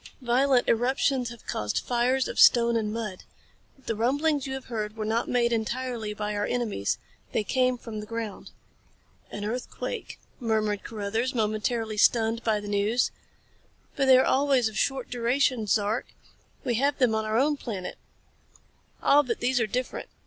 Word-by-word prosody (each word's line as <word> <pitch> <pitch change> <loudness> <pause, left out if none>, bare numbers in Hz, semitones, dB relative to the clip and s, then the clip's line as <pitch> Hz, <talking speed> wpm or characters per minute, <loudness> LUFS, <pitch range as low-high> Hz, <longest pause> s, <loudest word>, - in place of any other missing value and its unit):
Violent 250 +1 +3
eruptions 250 +1 +1
have 235 -1 -12
caused 105 0 -2
fires 250 +2 +1
of - - -4
stone 235 -1 +6
and 215 -2 0
mud. 215 -4 -5 0.6
The - - -1
rumblings 280 +5 +1
you 265 - -3
have 265 - -7
heard 215 -2 -4
were 215 - -3
not 225 +2 0
made 240 -1 +2
entirely 230 0 -2
by 210 0 -3
our 205 0 -1
enemies. 220 - -1 0.4
They 220 - +1
came 255 +2 +1
from 225 -2 -7
the 210 - -7
ground. 225 -3 -5 0.8
"An 205 - -5
earthquake," 250 - -5 0.2
murmured 215 -4 0
Carruthers, 225 +4 -2
momentarily 220 0 -1
stunned 225 +1 +3
by 220 -2 +1
the 205 - -8
news. 205 +4 +1 0.8
"But 275 - +1
they 260 -1 +8
are 260 - +4
always 270 -3 +3
of 220 - -7
short 265 0 -1
duration, 245 -1 +1
Zark. 210 +2 +1 0.6
We 245 - 0
have 285 +1 +2
them 250 -5 +3
on 220 0 0
our 215 +1 0
own 290 +4 +3
planet." 205 -9 -6 1.0
"Ah, 290 - +6
but 245 -5 -3
these 250 +1 +1
are 225 - +1
different. 250 +4 -3
235 Hz, 165 wpm, -27 LUFS, 215-255 Hz, 1.0 s, they